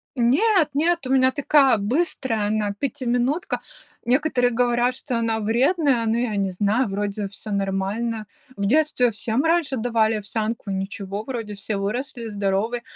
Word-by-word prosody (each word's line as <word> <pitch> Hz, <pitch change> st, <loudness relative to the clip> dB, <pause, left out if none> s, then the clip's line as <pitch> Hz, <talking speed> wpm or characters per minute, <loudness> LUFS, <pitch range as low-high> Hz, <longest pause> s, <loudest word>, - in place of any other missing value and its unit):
Нет, 310 Hz, -, +3 dB
нет, 325 Hz, -1 st, +1 dB
у 265 Hz, -, +1 dB
меня 260 Hz, -1 st, +4 dB
такая 280 Hz, -2 st, +4 dB
быстрая 225 Hz, -, -1 dB
она, 210 Hz, -1 st, 0 dB
пятиминутка. 260 Hz, -, -1 dB, 0.4 s
Некоторые 250 Hz, 0 st, +2 dB
говорят, 245 Hz, +1 st, +1 dB
что 250 Hz, -3 st, -3 dB
она 225 Hz, -1 st, 0 dB
вредная, 245 Hz, -, +2 dB
но 225 Hz, -, +1 dB
я 235 Hz, -3 st, -1 dB
не 195 Hz, -1 st, 0 dB
знаю, 210 Hz, +6 st, +1 dB
вроде 200 Hz, +1 st, -2 dB
всё 205 Hz, +2 st, -9 dB
нормально. 200 Hz, +3 st, -2 dB, 0.3 s
В 200 Hz, -, -1 dB
детстве 255 Hz, -1 st, +3 dB
всем 225 Hz, +5 st, -1 dB
раньше 325 Hz, -4 st, +1 dB
давали 225 Hz, -1 st, +1 dB
овсянку, 215 Hz, 0 st, -3 dB
ничего, 195 Hz, +1 st, -4 dB
вроде 225 Hz, -4 st, -5 dB
все 200 Hz, +1 st, -4 dB
выросли, 235 Hz, +4 st, -3 dB
здоровы. 205 Hz, +3 st, -1 dB
230 Hz, 145 wpm, -23 LUFS, 205-260 Hz, 0.4 s, меня